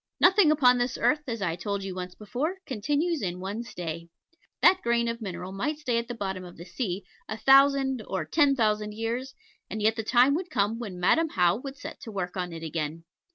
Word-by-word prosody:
Nothing 375 -2 +6
upon 255 -5 +5
this 245 +1 -1
earth, 300 0 +2
as 230 -4 -3
I 170 -3 0
told 200 +2 -3
you 195 -1 -4
once 180 0 -6
before, 265 - -3
continues 290 +7 -1
in 180 -2 -3
one 200 +5 -4
stay. 170 -7 -6 0.5
That 370 +1 +6
grain 235 0 +1
of 230 0 -3
mineral 185 -2 -5
might 275 +11 -2
stay 250 -6 0
at 235 - -5
the 240 - -5
bottom 190 -4 -4
of 175 -1 -11
the 170 - -9
sea 185 0 -4 0.2
a 220 - -4
thousand 270 +1 +5
or 190 - -2
ten 290 -4 +3
thousand 210 -3 0
years, 235 +4 -3 0.3
and 215 - -4
yet 220 +1 +2
the 225 - -3
time 250 +4 +4
would 355 +4 -2
come 215 +1 0
when 200 -7 -6
Madam 320 - +3
How 180 - +2
would 275 +2 -8
set - - -9
to 225 - -8
work 180 -3 -4
on 180 -2 -3
it 165 -1 -7
again. 160 0 -4
225 Hz, 215 wpm, -27 LUFS, 185-270 Hz, 0.5 s, Nothing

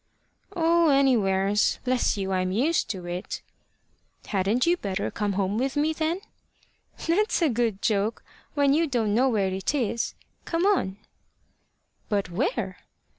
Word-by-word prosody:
"Oh, 335 -1 +3
anywheres. 210 -8 +3
Bless 255 -3 +1
you, 195 -1 -2
I'm 185 -1 0
used 275 - +1
to 185 -4 -4
it." 175 +3 -5 0.8
"Hadn't 205 +5 +1
you 345 +1 +4
better 200 - -3
come 205 -2 -1
home 195 +2 0
with 270 +2 -1
me, 305 +2 +2
then?" 325 +4 -1 0.8
"That's 410 +7 +2
a 320 - +4
good 230 -4 -1
joke, 215 0 0 0.3
when 285 -1 +3
you 325 +2 +2
don't 230 -6 0
know 255 +4 +3
where 200 -5 +1
it 190 +9 -2
is. 235 -3 -1 0.3
Come 335 +2 -1
on." 285 - +1 1.1
"But 200 -4 -1
where?" 260 - -1
230 Hz, 140 wpm, -26 LUFS, 195-300 Hz, 1.1 s, you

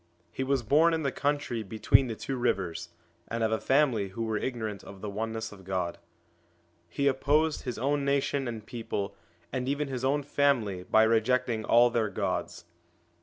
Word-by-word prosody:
He 130 - -3
was 135 -1 0
born 160 +8 +4
in 160 - -2
the 140 - 0
country 145 -5 -1
between 110 +5 +3
the 115 - -4
two 135 - -4
rivers, 90 -8 -1 0.4
1 - - -4
and 115 - -1
of 110 - +1
a 110 - 0
family 130 -7 +3
who 115 +5 -4
were 110 -1 -1
ignorant 110 -6 -4
of 100 - -11
the 105 - -5
Oneness 110 +1 -3
of 100 -2 -13
God. 90 -2 -2 0.9
He 140 +11 -2
opposed 145 +3 +2
his 125 -3 -3
own 140 +4 0
nation 140 -1 0
and 110 -3 -5
people, 110 -4 -4 0.4
and 130 0 -1
even 145 0 -1
his 130 -2 -4
own 140 +2 +1
family, 135 -10 +1
by 110 +4 +4
rejecting 115 +1 +2
all 120 +1 +5
their 115 -3 +1
gods. 85 - -3
120 Hz, 180 wpm, -29 LUFS, 110-140 Hz, 0.9 s, all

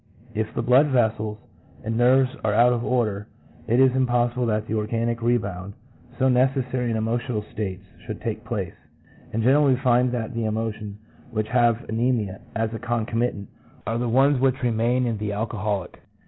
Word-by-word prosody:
If 110 0 -2
the - - -1
blood 130 +5 +5
vessels 110 -5 0 0.5
and 115 +1 -2
nerves 125 +2 +4
are 105 -1 +1
out 120 +2 +5
of 120 -1 -2
order, 110 -5 0 0.4
it 120 +3 +3
is 130 -1 +5
impossible 120 -1 +1
that 110 -1 0
the 110 - -4
organic 115 +2 -1
rebound, 100 -5 -1 0.4
so 130 - +3
necessary 130 -1 +1
in 115 - 0
all 110 - -1
emotional 115 -1 -1
states, 100 -3 -5 0.2
should - - -5
take - - -4
place; - - -4 0.6
and 115 +1 -1
generally 135 +2 +4
we - - -6
find 125 -1 +3
that 120 0 -3
the 115 -1 -2
emotions 110 -1 -3 0.3
which 110 -2 -2
have 120 0 +2
anemia 110 -4 -1
as 115 0 -1
a 115 - -4
concomitant 115 -2 -2 0.4
are 115 +1 -1
the 120 -1 -1
ones 135 +3 +4
which 130 0 +1
remain 120 +2 +1
in 115 -3 -2
the 105 -1 -2
alcoholic. 105 -3 -3
115 Hz, 175 wpm, -24 LUFS, 110-125 Hz, 0.6 s, blood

